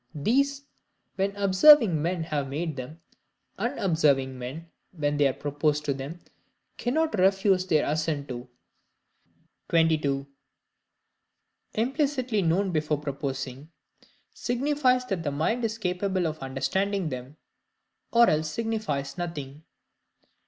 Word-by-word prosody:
These, 275 Hz, -, +1 dB, 0.5 s
when 195 Hz, +1 st, -1 dB
observing 200 Hz, -, +6 dB
men 170 Hz, +1 st, -1 dB
have 145 Hz, -4 st, -2 dB
made 155 Hz, +2 st, -3 dB
them, 140 Hz, +6 st, -8 dB, 0.6 s
unobserving 160 Hz, -, +1 dB
men, 155 Hz, +7 st, -7 dB, 0.2 s
when 145 Hz, -3 st, -1 dB
they 145 Hz, -1 st, +4 dB
are 135 Hz, -, 0 dB
proposed 150 Hz, +1 st, -1 dB
to 140 Hz, -, +1 dB
them 140 Hz, +6 st, -7 dB, 0.6 s
cannot 290 Hz, -2 st, 0 dB
refuse 190 Hz, 0 st, +3 dB
their 155 Hz, -4 st, +3 dB
assent 150 Hz, -1 st, -1 dB
to. 125 Hz, 0 st, -6 dB, 1.2 s
22. 155 Hz, -4 st, +2 dB, 1.5 s
Implicitly 255 Hz, -2 st, 0 dB
known 185 Hz, +3 st, +1 dB
before 150 Hz, -2 st, 0 dB
proposing, 140 Hz, -1 st, -5 dB, 0.6 s
signifies 255 Hz, 0 st, +1 dB
that 195 Hz, -8 st, -2 dB
the 155 Hz, -, -1 dB
Mind 160 Hz, +12 st, -1 dB
is 225 Hz, 0 st, -1 dB
capable 185 Hz, -2 st, -1 dB
of 155 Hz, -1 st, -3 dB
understanding 190 Hz, +8 st, -1 dB
them, 130 Hz, +2 st, -7 dB, 0.7 s
or 235 Hz, 0 st, +6 dB
else 155 Hz, 0 st, +1 dB
signifies 210 Hz, -8 st, -3 dB
nothing. 150 Hz, -4 st, -5 dB
165 Hz, 110 wpm, -27 LUFS, 145-205 Hz, 1.5 s, observing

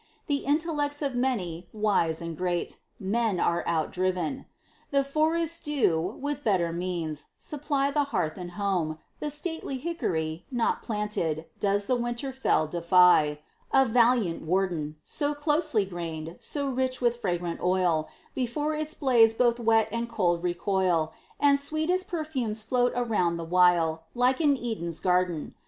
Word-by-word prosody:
The 285 Hz, -, +1 dB
intellects 295 Hz, -1 st, 0 dB
of 275 Hz, -2 st, -1 dB
many, 190 Hz, -10 st, -1 dB
wise 195 Hz, -7 st, +1 dB
and 170 Hz, -1 st, -5 dB
great, 175 Hz, +1 st, -2 dB, 0.2 s
Men 215 Hz, -1 st, 0 dB
are 170 Hz, 0 st, +1 dB
out 160 Hz, -2 st, 0 dB
driven. 180 Hz, -4 st, -1 dB, 0.4 s
The 275 Hz, -1 st, +2 dB
forests 320 Hz, +3 st, 0 dB
do, 265 Hz, -, +1 dB, 0.2 s
with 290 Hz, 0 st, -3 dB
better 175 Hz, -6 st, +1 dB
means, 170 Hz, -4 st, -3 dB
supply 285 Hz, -1 st, -1 dB
The 290 Hz, 0 st, +1 dB
hearth 180 Hz, -, -1 dB
and 175 Hz, -2 st, -7 dB
house; 180 Hz, -6 st, -1 dB, 0.2 s
the 300 Hz, -, -2 dB
stately 300 Hz, -2 st, -4 dB
hickory, 175 Hz, -, -2 dB
Not 240 Hz, -3 st, 0 dB
planted, 210 Hz, -8 st, -2 dB
does 200 Hz, 0 st, +1 dB
the 255 Hz, -, +2 dB
winter 240 Hz, +3 st, -3 dB
fell 260 Hz, -11 st, +2 dB
defy, 170 Hz, -2 st, +4 dB, 0.3 s
A 270 Hz, 0 st, +5 dB
valiant 230 Hz, -6 st, +3 dB
warden; 165 Hz, -3 st, -1 dB
So 295 Hz, -1 st, -2 dB
closely 295 Hz, -, +1 dB
grained, 165 Hz, -3 st, -6 dB
so 285 Hz, -2 st, -3 dB
rich 260 Hz, -1 st, -1 dB
with 240 Hz, -1 st, +1 dB
fragrant 175 Hz, -3 st, -2 dB
oil, 180 Hz, -4 st, +1 dB, 0.2 s
Before 290 Hz, +5 st, -1 dB
its 310 Hz, 0 st, -3 dB
blaze 235 Hz, -5 st, +4 dB
both 240 Hz, 0 st, +2 dB
wet 225 Hz, -2 st, +3 dB
and 235 Hz, +1 st, -2 dB
cold 175 Hz, -6 st, +1 dB
recoil; 175 Hz, -2 st, 0 dB, 0.3 s
And 285 Hz, -1 st, +4 dB
sweetest 315 Hz, +6 st, 0 dB
perfumes 270 Hz, -, -2 dB
float 245 Hz, +2 st, +2 dB
around 210 Hz, -9 st, +1 dB
the 165 Hz, -, -5 dB
while, 165 Hz, -2 st, +3 dB
Like 250 Hz, +4 st, +2 dB
'n 290 Hz, -3 st, +4 dB
Eden's 190 Hz, -10 st, -3 dB
garden. 180 Hz, -3 st, 0 dB
215 Hz, 145 wpm, -27 LUFS, 175-275 Hz, 0.4 s, A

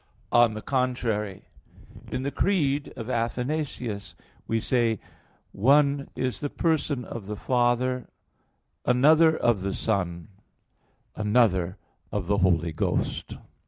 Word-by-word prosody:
On 120 Hz, -2 st, +5 dB
the 110 Hz, -, -6 dB
contrary, 115 Hz, -7 st, -1 dB, 0.7 s
In 130 Hz, -, -2 dB
the 140 Hz, -, -2 dB
Creed 145 Hz, -8 st, +1 dB
of 115 Hz, -, -6 dB
Athanasius 120 Hz, -, -3 dB, 0.3 s
we 115 Hz, -, +1 dB
say: 115 Hz, -2 st, +1 dB, 0.5 s
"One 140 Hz, +5 st, +3 dB
is 130 Hz, -1 st, -2 dB
the 145 Hz, -, -3 dB
person 150 Hz, -6 st, 0 dB
of 105 Hz, -4 st, -7 dB
the 105 Hz, -, -4 dB
Father, 125 Hz, +2 st, +1 dB, 0.8 s
another 155 Hz, +6 st, +5 dB
of 115 Hz, -5 st, +2 dB
the 95 Hz, 0 st, -2 dB
Son, 90 Hz, -4 st, -2 dB, 0.9 s
another 105 Hz, -4 st, +2 dB, 0.3 s
of 105 Hz, -3 st, -2 dB
the 100 Hz, +2 st, +1 dB
Holy 85 Hz, -4 st, +2 dB
Ghost." -, -, -2 dB
120 Hz, 115 wpm, -26 LUFS, 105-135 Hz, 0.9 s, On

